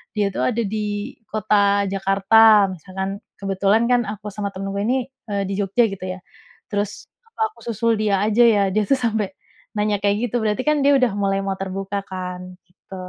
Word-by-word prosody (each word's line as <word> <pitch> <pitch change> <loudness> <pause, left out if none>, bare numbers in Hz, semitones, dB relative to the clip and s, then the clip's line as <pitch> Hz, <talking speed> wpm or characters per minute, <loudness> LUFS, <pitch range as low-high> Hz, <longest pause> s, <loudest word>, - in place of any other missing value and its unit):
"Dia, 205 -1 +2
tuh, - - -1
ada 235 -1 -2
di 210 +2 -3 0.2
kota 200 -1 +2
Jakarta." 195 +2 +5
Misalkan. 190 +3 -5 0.2
Kebetulan, 195 +3 +1
kan, 245 - +4
aku 210 0 -6
sama 200 0 -3
temenku 195 +1 -4
ini, 255 +2 0 0.2
eee, 200 -1 0
di - - -2
Jogja, 200 +4 +2
gitu, 195 - -7
ya. 185 0 -5 0.5
Terus, 205 0 -3 0.2
"Apa 450 0 -10
aku - - -19
susul 230 0 +1
dia 205 -3 +1
aja, 220 +3 +4
ya?" 215 -4 +5
Dia, 215 - +3
tuh, 275 - +3
sampai 220 -4 -1 0.4
nanya 210 0 +1
kayak 200 0 +3
gitu. 245 - -5
Berarti, 215 +4 0
kan, 300 -1 +3
dia 285 - +6
udah 250 -4 +2
mulai 195 -1 +1
mau 195 -1 -2
terbuka, 195 +1 -3
kan. 180 -1 -6
Gitu. 190 +1 -14
205 Hz, 185 wpm, -21 LUFS, 195-220 Hz, 0.5 s, dia